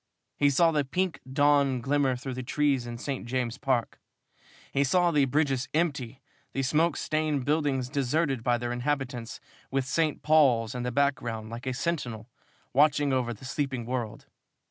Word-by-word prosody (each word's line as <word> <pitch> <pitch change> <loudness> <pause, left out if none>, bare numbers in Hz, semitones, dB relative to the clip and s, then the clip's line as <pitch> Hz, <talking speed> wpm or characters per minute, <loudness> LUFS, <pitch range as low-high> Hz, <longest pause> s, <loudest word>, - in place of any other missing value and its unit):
He 145 - +3
saw 165 +4 +4
the 150 -2 +1
pink 180 +6 -1
dawn 140 -2 +3
glimmer 135 0 +1
through 130 +1 -5
the 130 - -4
trees 135 -1 0
in 120 0 -6
St. 135 +2 -4
James's 125 0 -2
Park. 130 -4 -1 0.7
He 140 - +3
saw 175 +5 +3
the 145 -3 +3
bridges 135 -1 0
empty, 140 -7 -1 0.3
the 135 - -1
smoke 150 +3 +2
stained 155 -4 -1
buildings 145 -4 +1
deserted 140 -1 0
by 120 0 +2
their 120 0 -3
inhabitants, 125 -2 -3 0.3
with 135 -1 0
St. 155 +3 0
Paul's 130 -7 +4
in 125 - -4
the 125 0 -2
background 120 -5 -1
like 120 +3 -7
a 130 - 0
sentinel 125 -7 -3 0.4
watching 145 0 +3
over 125 -2 0
the 120 +3 -9
sleeping 130 -3 -2
world. 120 -3 -4
135 Hz, 165 wpm, -28 LUFS, 125-145 Hz, 0.7 s, saw